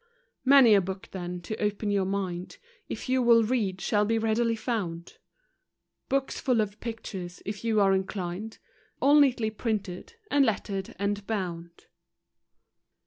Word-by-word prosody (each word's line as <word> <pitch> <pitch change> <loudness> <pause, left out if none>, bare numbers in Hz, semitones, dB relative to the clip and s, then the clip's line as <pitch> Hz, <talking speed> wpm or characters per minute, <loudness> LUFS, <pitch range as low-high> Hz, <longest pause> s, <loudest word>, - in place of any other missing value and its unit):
Many 265 -4 +7
a 200 - +6
book 190 +1 -6
then, 180 -1 -5
to 215 +6 -5
open 210 0 -1
your 200 -2 +1
mind, 185 -2 -3 0.3
If - - -5
you 260 0 +2
will 235 -1 +6
read, 210 -5 0
shall 210 +2 +1
be 225 +2 +1
readily 225 +1 +1
found 205 -8 -3
$ - - -16 1.0
Books 270 0 0
full 250 -3 +1
of 210 -1 -2
pictures, 190 -6 -6
if 205 +1 -5
you 225 -2 +2
are 195 -1 +4
inclined, 190 +2 -3 0.4
All 285 +3 +6
neatly 245 -6 +3
printed, 215 - -4 0.2
and 285 -1 +5
lettered 200 -4 -2
and 200 +1 -2
bound. 170 -5 -4
210 Hz, 145 wpm, -28 LUFS, 190-230 Hz, 1.0 s, Many